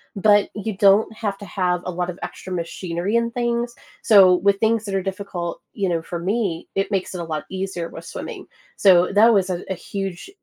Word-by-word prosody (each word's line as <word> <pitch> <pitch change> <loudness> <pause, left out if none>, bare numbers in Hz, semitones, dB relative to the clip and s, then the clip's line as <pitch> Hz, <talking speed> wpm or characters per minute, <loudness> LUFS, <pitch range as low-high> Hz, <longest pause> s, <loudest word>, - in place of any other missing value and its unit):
but 205 0 +4
you 210 0 -4
don't 200 +2 +4
have 205 -3 -3
to 205 - -10
have 180 -3 -1
a 180 - -2
lot 180 0 -2
of 180 - -6
extra 185 - -7
machinery 175 +3 -3
and 235 0 +1
things. 240 0 -1 0.3
So, 195 -4 +7
with 195 +2 +2
things 225 0 +1
that 200 -2 -3
are 190 - 0
difficult, 185 -3 -5
you 195 -2 -1
know, 170 -2 0
for 170 +1 -5
me, 185 -1 -2
it 195 0 -1
makes 195 -3 -2
it 180 - -4
a - - -3
lot 155 -2 -4
easier 190 -3 -4
with - - -10
swimming. - - -7 0.3
So 180 -3 +5
that 225 +3 +6
was 195 -2 +2
a 175 0 -3
a 190 - -1
huge 195 - -6
195 Hz, 215 wpm, -22 LUFS, 180-210 Hz, 0.3 s, So